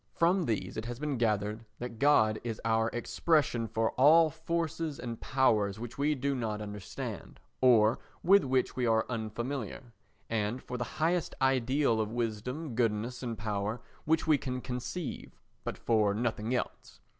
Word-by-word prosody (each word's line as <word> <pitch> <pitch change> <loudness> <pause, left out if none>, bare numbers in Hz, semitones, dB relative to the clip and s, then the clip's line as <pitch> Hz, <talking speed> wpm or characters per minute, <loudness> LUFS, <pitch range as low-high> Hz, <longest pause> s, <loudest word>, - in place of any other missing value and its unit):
From 175 +1 +3
these 110 -3 -2
it 110 - -3
has 120 0 -5
been 145 -2 -2
gathered 105 -1 0
that 120 -2 -7
God 110 -7 +4
is 115 -2 -4
our 115 0 +2
expression 120 -1 +1
for 110 0 0
all 155 +4 +6
forces 160 -1 -2
and 120 -2 -6
powers 110 -6 +2
which 120 +2 -7
we 150 +2 +2
do 140 +1 -1
not 110 -5 -2
understand, 105 -2 -7 0.2
or 115 -3 +5 0.2
with 195 +3 +6
which 130 -1 +1
we 125 -1 0
are 110 -1 +3
unfamiliar, 120 +1 -4 0.3
and 115 +2 -1
for 125 -1 -5
the - - 0
highest 170 +2 +1
ideal 130 -2 +2
of 110 0 -3
wisdom, 120 +5 -3
goodness 115 +1 0
and 120 -3 -4
power 105 +1 -2 0.3
which 160 +1 +2
we 155 -3 +4
can 125 -1 -3
conceive, 125 +6 -5 0.2
but - - -4
for 105 -3 +2
nothing 110 0 -1
else. - - -5
120 Hz, 155 wpm, -31 LUFS, 110-140 Hz, 0.3 s, all